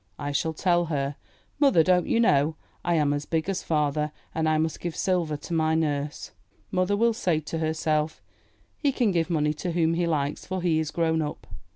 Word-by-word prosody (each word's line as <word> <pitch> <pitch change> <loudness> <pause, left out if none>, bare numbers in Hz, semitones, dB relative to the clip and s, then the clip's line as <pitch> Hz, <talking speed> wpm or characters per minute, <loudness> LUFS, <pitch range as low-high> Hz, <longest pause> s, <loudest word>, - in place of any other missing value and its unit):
I 145 0 -3
shall 160 +3 0
tell 175 +1 +2
her, 140 -3 -2 0.4
"Mother, 275 - +5
don't 180 +1 +3
you 230 - +2
know, 155 -8 +3 0.3
I 175 -1 +1
am 150 -2 +2
as 145 0 -3
big 160 0 -1
as 195 -1 -1
father, 150 -1 0 0.2
and 160 -1 +1
I 155 - +3
must 160 0 -1
give 170 -2 -4
silver 170 -5 0
to 170 - -7
my 160 -1 +2
nurse." 150 -2 -2 0.4
Mother 185 +2 +1
will 230 +1 +3
say 175 -7 0
to 160 +2 -4
herself, 155 -1 0 0.6
"He 285 - +2
can 245 -6 +1
give 170 -1 0
money 150 -3 +1
to 170 +3 -4
whom 165 -1 +2
he 170 0 0
likes, 145 -3 -1
for 185 -1 -4
he 165 -3 +2
is 160 -2 -1
grown 160 -1 +1
up." 150 - -5
160 Hz, 205 wpm, -26 LUFS, 150-175 Hz, 0.6 s, Mother